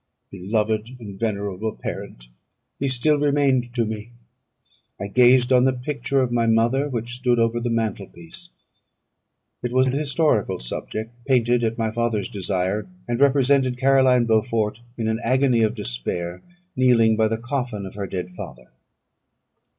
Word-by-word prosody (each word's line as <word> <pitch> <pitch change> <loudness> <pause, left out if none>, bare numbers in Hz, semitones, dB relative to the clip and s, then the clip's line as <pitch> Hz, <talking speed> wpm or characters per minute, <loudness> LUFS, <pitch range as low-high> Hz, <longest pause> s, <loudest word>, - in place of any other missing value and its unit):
Beloved 110 +5 -2
and 100 -4 -9
venerable 105 -1 -2
parent! - - -7 0.5
He 140 - 0
still 140 +4 +2
remained 140 -4 +2
to 120 -2 +1
me. 110 +1 -6 0.9
I - - -4
gazed 125 +4 +4
on 125 0 +5
the 130 - +3
picture 135 +1 -1
of 125 -2 -1
my 120 -1 +1
mother, 120 +6 +2
which 120 -2 -4
stood 125 -1 +1
over 115 0 +1
the 120 0 -2
mantel 110 -4 -2
piece. 85 -1 -12 1.1
It 120 - -3
was 130 +1 +3
an 130 - 0
historical 145 -5 +1
subject, 110 - -5
painted 120 -2 +2
at 115 0 -1
my 110 -1 -1
father's 115 -3 -1
desire, 95 +1 -2 0.2
and 120 0 -2
represented 135 -2 +3
Caroline 130 -2 +4
Beaufort 110 -1 0 0.2
in 115 -2 -2
an 110 0 0
agony 130 -1 +2
of 110 +1 +1
despair, 85 - -4 0.3
kneeling 120 -3 +4
by 110 0 +2
the 110 +1 -1
coffin 120 -4 -4
of 95 - -8
her 100 -1 -5
dead 90 0 -5
father. - - -10
115 Hz, 150 wpm, -23 LUFS, 105-130 Hz, 1.1 s, on